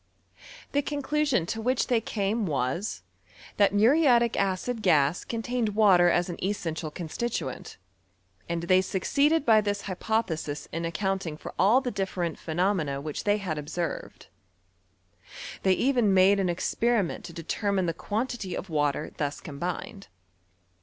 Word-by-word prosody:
The 285 Hz, -, +2 dB
conclusion 290 Hz, -, 0 dB
to 225 Hz, +6 st, -4 dB
which 250 Hz, +3 st, +1 dB
they 235 Hz, -3 st, +1 dB
came 210 Hz, 0 st, -1 dB
was,' 140 Hz, +7 st, -2 dB, 0.6 s
tluit 200 Hz, -, +5 dB
muriatic 235 Hz, +2 st, +4 dB
acid 200 Hz, +5 st, -1 dB
gas 155 Hz, -4 st, +3 dB
contained 230 Hz, -2 st, -2 dB
water 190 Hz, -5 st, +6 dB
as 175 Hz, 0 st, +2 dB
an 175 Hz, -1 st, -6 dB
esaeatial 165 Hz, -5 st, -2 dB
constituent; 165 Hz, -, -4 dB, 0.7 s
and 170 Hz, 0 st, -2 dB
they 185 Hz, +2 st, +4 dB
succeeded 285 Hz, -, +1 dB
by 220 Hz, -2 st, +6 dB
this 205 Hz, -1 st, -2 dB
hypothesii 185 Hz, -7 st, -2 dB
in 165 Hz, +1 st, -3 dB
accounting 185 Hz, -2 st, -2 dB
for -, -, -9 dB
all 210 Hz, +8 st, +5 dB
the 250 Hz, -2 st, -3 dB
different 190 Hz, -5 st, -3 dB
phenomena 160 Hz, -4 st, 0 dB
which 150 Hz, +1 st, -5 dB
they 205 Hz, 0 st, +3 dB
had 180 Hz, -7 st, -3 dB
observed. 160 Hz, +3 st, -5 dB, 1.4 s
Tliey 190 Hz, -1 st, +4 dB
even 245 Hz, -6 st, +2 dB
made 190 Hz, +2 st, +5 dB
an 190 Hz, -2 st, +1 dB
experiment 210 Hz, +3 st, 0 dB
to -, -, -8 dB
determine 190 Hz, +3 st, -1 dB
the 165 Hz, -, -1 dB
quantity 210 Hz, 0 st, -3 dB
of 180 Hz, -, -7 dB
water 150 Hz, 0 st, 0 dB
thus 145 Hz, -1 st, -2 dB
combined. 175 Hz, +7 st, -6 dB
195 Hz, 135 wpm, -27 LUFS, 170-225 Hz, 1.4 s, water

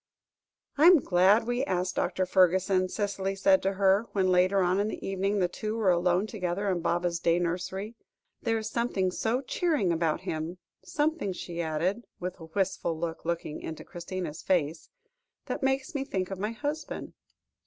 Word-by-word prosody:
"I 315 Hz, -, +8 dB
am 360 Hz, -1 st, +9 dB
glad 200 Hz, -, +4 dB
we 245 Hz, +2 st, 0 dB
asked 185 Hz, -6 st, -1 dB
Dr. 185 Hz, +1 st, 0 dB
Fergusson," 185 Hz, 0 st, +3 dB
Cicely 195 Hz, -1 st, -2 dB
said 195 Hz, -1 st, +4 dB
to 195 Hz, +1 st, 0 dB
her, 195 Hz, +3 st, +3 dB
when 190 Hz, -2 st, +2 dB
later 185 Hz, +2 st, +4 dB
on 180 Hz, +2 st, +2 dB
in 205 Hz, -, +1 dB
the 215 Hz, -, -5 dB
evening 195 Hz, +1 st, 0 dB
the 185 Hz, -3 st, +2 dB
two 215 Hz, +4 st, -4 dB
were 205 Hz, -5 st, +3 dB
alone 175 Hz, +2 st, +2 dB
together 200 Hz, -2 st, -3 dB
in 180 Hz, -, 0 dB
Baba's 175 Hz, 0 st, 0 dB
day 170 Hz, 0 st, +2 dB
nursery; 185 Hz, +5 st, -3 dB, 0.5 s
"there 225 Hz, 0 st, +1 dB
is 220 Hz, -1 st, -3 dB
something 220 Hz, -5 st, 0 dB
so 230 Hz, +7 st, 0 dB
cheering 285 Hz, -, 0 dB
about 165 Hz, -2 st, 0 dB
him, 160 Hz, +3 st, -4 dB, 0.3 s
something," 295 Hz, -, -1 dB
she 170 Hz, -1 st, -5 dB
added, 170 Hz, +7 st, -1 dB, 0.2 s
with 180 Hz, +1 st, -5 dB
a 165 Hz, -, -9 dB
wistful 175 Hz, -1 st, -1 dB
look 165 Hz, 0 st, -4 dB, 0.2 s
into 155 Hz, +1 st, -6 dB
Christina's 175 Hz, -3 st, -6 dB
face, 160 Hz, -3 st, 0 dB, 0.6 s
"that -, -, -4 dB
makes 270 Hz, +4 st, 0 dB
me 280 Hz, -2 st, -1 dB
think 190 Hz, -7 st, -3 dB
of 190 Hz, -, -5 dB
my 210 Hz, +3 st, -1 dB
husband." 290 Hz, +6 st, -4 dB
190 Hz, 170 wpm, -28 LUFS, 175-215 Hz, 0.6 s, am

